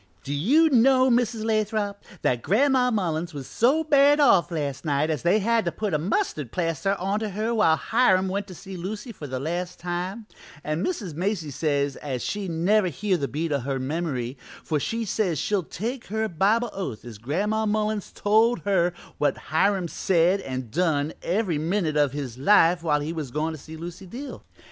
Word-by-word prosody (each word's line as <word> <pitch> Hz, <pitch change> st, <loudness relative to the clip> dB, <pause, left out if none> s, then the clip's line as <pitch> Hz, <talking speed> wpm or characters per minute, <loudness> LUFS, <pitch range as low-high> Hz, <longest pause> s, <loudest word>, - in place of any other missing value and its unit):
"Do 140 Hz, -, -4 dB
you 285 Hz, -, +4 dB
know, 260 Hz, +1 st, +5 dB
Mrs. 235 Hz, -2 st, +1 dB
Lathrop, 215 Hz, -2 st, -1 dB, 0.2 s
that 120 Hz, -2 st, +1 dB
Gran'ma 250 Hz, -, +3 dB
Mullins 170 Hz, -6 st, -1 dB
was 140 Hz, -2 st, -6 dB
so 270 Hz, -, +2 dB
bad 290 Hz, -1 st, +5 dB
off 240 Hz, -11 st, +5 dB
last 145 Hz, -5 st, -3 dB
night 150 Hz, 0 st, +1 dB
as 150 Hz, -, -2 dB
they 175 Hz, +5 st, +3 dB
had 225 Hz, +2 st, +2 dB
to -, -, 0 dB
put 210 Hz, -4 st, -3 dB
a 150 Hz, -, +2 dB
mustard 155 Hz, -, -1 dB
plaster 170 Hz, +4 st, 0 dB
onto 200 Hz, +4 st, -1 dB
her 215 Hz, +4 st, -2 dB
while 210 Hz, -8 st, +4 dB
Hiram 190 Hz, -1 st, +2 dB
went 195 Hz, +2 st, -2 dB
to 185 Hz, -, -10 dB
see 190 Hz, +3 st, -9 dB
Lucy 205 Hz, +7 st, -5 dB
for 155 Hz, -9 st, -8 dB
the 130 Hz, -1 st, -4 dB
last 175 Hz, +5 st, -3 dB
time, 180 Hz, +5 st, -4 dB, 0.4 s
an' 155 Hz, +4 st, -2 dB
Mrs. 210 Hz, -, -3 dB
Macy 170 Hz, -2 st, -2 dB
says 140 Hz, -1 st, -1 dB
as 130 Hz, -4 st, -4 dB
she 205 Hz, -2 st, -3 dB
never 185 Hz, +5 st, +2 dB
hear 190 Hz, +5 st, 0 dB
the 140 Hz, -5 st, -1 dB
beat 155 Hz, +4 st, -3 dB
o' 140 Hz, -, +1 dB
her 135 Hz, +2 st, -2 dB
memory, 130 Hz, -3 st, -3 dB, 0.2 s
for 155 Hz, -2 st, -1 dB
she 230 Hz, +10 st, -2 dB
says 185 Hz, -5 st, 0 dB
she'll 205 Hz, +7 st, 0 dB
take 230 Hz, +9 st, -5 dB
her 220 Hz, +1 st, -1 dB
Bible 210 Hz, +6 st, +1 dB
oath 135 Hz, -, -5 dB
as 115 Hz, -4 st, -9 dB
Gran'ma 205 Hz, -, -1 dB
Mullins 210 Hz, -1 st, -1 dB
told 220 Hz, +3 st, +2 dB
her 180 Hz, -3 st, +1 dB, 0.3 s
what 145 Hz, -2 st, +1 dB, 0.2 s
Hiram 190 Hz, +2 st, +2 dB
said 180 Hz, +3 st, +2 dB
and 130 Hz, -, -5 dB
done 155 Hz, -2 st, 0 dB
every 180 Hz, -4 st, 0 dB
minute 165 Hz, -1 st, 0 dB
o' 145 Hz, -1 st, +4 dB
his 135 Hz, -3 st, -6 dB
life 175 Hz, +1 st, +5 dB
while 150 Hz, -3 st, +1 dB
he 155 Hz, +3 st, -3 dB
was 155 Hz, -5 st, -4 dB
gone 150 Hz, +5 st, -1 dB
to 160 Hz, -, -6 dB
see 160 Hz, +3 st, -10 dB
Lucy 175 Hz, +3 st, -8 dB
Dill. 265 Hz, +9 st, -8 dB
180 Hz, 190 wpm, -25 LUFS, 150-215 Hz, 0.4 s, know